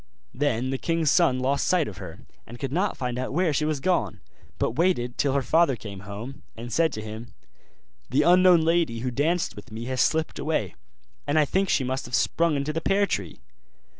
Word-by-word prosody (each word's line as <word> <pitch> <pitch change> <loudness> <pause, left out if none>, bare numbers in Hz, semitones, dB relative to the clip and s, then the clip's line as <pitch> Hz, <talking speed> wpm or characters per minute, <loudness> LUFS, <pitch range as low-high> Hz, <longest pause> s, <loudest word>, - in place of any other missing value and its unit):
Then 130 -1 0
the 135 - -2
king's 165 -3 +1
son 145 -5 +3
lost 135 +2 0
sight 180 -4 +2
of 95 - -8
her, 90 -5 -9 0.3
and 120 - -10
could 135 +1 -4
not 185 +7 0
find 125 -1 -3
out 130 +1 -3
where 170 -1 +1
she 150 +2 0
was 155 -2 -1
gone, 135 - 0 0.4
but - - 0
waited 125 -5 0
till 140 -2 +1
her 140 -1 +1
father 160 0 +3
came 100 -3 -9
home, 115 +7 -7 0.2
and 120 0 -7
said 165 -1 +3
to 110 - -5
him, 110 +2 -9 0.7
'The 145 +3 +2
unknown 180 0 +6
lady 160 -8 +1
who 125 0 -2
danced 160 +7 0
with 105 +4 -12
me 115 +2 -6
has 130 0 -1
slipped 160 0 0
away, 150 - -1 0.5
and 145 - +1
I 155 - +5
think 190 +6 0
she 135 - +2
must 130 +1 -3
have 120 -1 -2
sprung 170 -2 +1
into 140 +2 -2
the 165 - -2
pear 200 +4 +2
tree. 95 - -4
140 Hz, 210 wpm, -25 LUFS, 120-165 Hz, 0.7 s, unknown